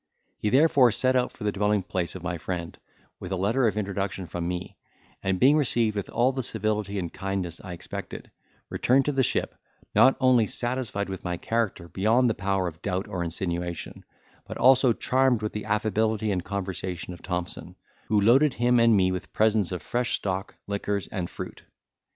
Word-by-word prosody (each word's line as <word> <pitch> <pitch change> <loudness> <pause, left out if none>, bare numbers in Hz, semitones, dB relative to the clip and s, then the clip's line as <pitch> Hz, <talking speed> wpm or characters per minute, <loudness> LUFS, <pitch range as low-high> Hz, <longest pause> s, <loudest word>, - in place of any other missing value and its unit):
He 105 - 0
therefore 135 -1 +5
set 130 +4 +1
out 125 -1 +1
for - - -11
the 105 - +1
dwelling 105 0 +1
place 90 -1 -3
of 90 - -8
my 90 -2 -3
friend, 85 -1 -4 0.4
with 90 - -7
a - - +1
letter 110 +7 +2
of 105 -1 -1
introduction 100 -2 -2
from 85 0 -4
me; 90 0 -4 0.5
and 95 -1 0
being 135 +4 +6
received 120 -6 +1
with 100 - -3
all 120 +3 +2
the 130 - -2
civility 105 -3 -1
and 85 -3 -4
kindness 95 -4 -3
I 90 - -6
expected, 85 - -7 0.4
returned 135 +2 +2
to 150 - +1
the 135 -1 +1
ship, 130 - 0 0.4
not 130 - +5
only 125 -4 +4
satisfied 120 -5 -2
with 95 -1 -6
my 90 -1 -2
character 110 -5 -2
beyond 110 +8 +2
the - - -1
power 95 -2 -1
of 85 0 -8
doubt 95 -1 -2
or 90 -2 -3
insinuation, 85 0 -4 0.4
but - - -6
also 130 0 +5
charmed 130 -1 +2
with 105 - -2
the 105 - -4
affability 110 0 0
and 90 -3 -1
conversation 95 -2 -4
of 85 - -12
Thompson, 90 -1 -4 0.3
who 105 - +3
loaded 130 +7 +4
him 120 0 +3
and 115 -2 +5
me 95 -1 +3
with 90 -1 -5
presents 110 -3 +2
of 90 - -4
fresh 125 0 0
stock, 95 +1 -3
liquors, 100 0 -2
and 90 -4 -4
fruit. - - -8
100 Hz, 185 wpm, -26 LUFS, 95-120 Hz, 0.5 s, being